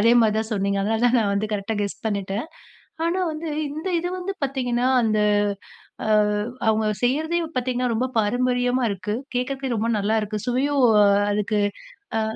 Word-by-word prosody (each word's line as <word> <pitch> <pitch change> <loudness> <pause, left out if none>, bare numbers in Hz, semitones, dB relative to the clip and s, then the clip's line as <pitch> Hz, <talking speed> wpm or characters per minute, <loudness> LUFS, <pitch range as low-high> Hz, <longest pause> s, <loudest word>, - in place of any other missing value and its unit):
அதேமாதிரி 230 -1 +4
தான் 220 +1 -3
சொன்னீங்க, 200 -1 0
அதனால 220 +3 0
தான் 245 +1 +3
நான் 205 -3 +1
வந்து 210 +2 -1
கரெக்ட்டா 210 +2 -2
கெஸ் 200 - -5
பண்ணிட்டேன், 200 +3 -2 0.6
ஆனா 350 +3 0
வந்து 310 +1 -5 0.2
இந்த 310 +6 -5
இது 355 +1 -3
வந்து 380 +2 -3
பார்த்தீங்கன்னா, 250 -2 0
அந்த 215 -2 +1 1.5
அவங்க 220 0 +2 0.2
செய்றதையும் 315 +6 0
பார்த்தீங்கன்னா, 250 -1 0
ரொம்ப 250 +3 +1
பாரம்பரியமா 245 +3 +1
இருக்கு, 200 +2 -3 0.2
கேட்கறதுக்கே 265 0 -2
ரொம்ப 225 +1 0
நல்லாருக்கு, 215 0 0
சுவையும் 265 +1 +2 0.5
அதுக்கு 210 +1 0 0.6
அ. - - +1
240 Hz, 140 wpm, -23 LUFS, 215-260 Hz, 1.5 s, அதேமாதிரி